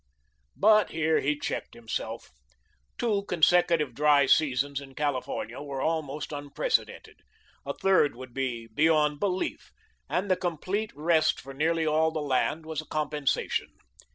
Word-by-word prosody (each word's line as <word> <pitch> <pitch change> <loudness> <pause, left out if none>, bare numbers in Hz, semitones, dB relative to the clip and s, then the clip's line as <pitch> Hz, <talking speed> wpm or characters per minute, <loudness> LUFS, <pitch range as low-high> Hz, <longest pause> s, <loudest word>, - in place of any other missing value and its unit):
But 215 +1 +5
here 160 0 +1
he 150 +2 0
checked - - -4
himself. 115 -1 -5 0.7
Two 210 -4 0
consecutive 170 -5 +3
dry 145 +1 +4
seasons 140 -1 +2
in 135 -1 -13
California 130 -4 -3
were 140 -2 -5
almost 155 -1 -2
unprecedented; 145 - -2 0.5
a - - -3
third 185 -9 +3
would 130 0 -10
be 125 -3 -3
beyond 150 0 +3
belief, 185 0 -2 0.4
and 190 +1 -1
the - - +5
complete 185 +5 -2
rest 160 +1 +2
for 135 +1 -10
nearly 160 +3 +1
all 155 +1 +3
the 160 0 -4
land 150 +2 0
was 160 -1 -3
a - - -16
compensation. 150 -2 -1
150 Hz, 135 wpm, -28 LUFS, 140-165 Hz, 0.7 s, But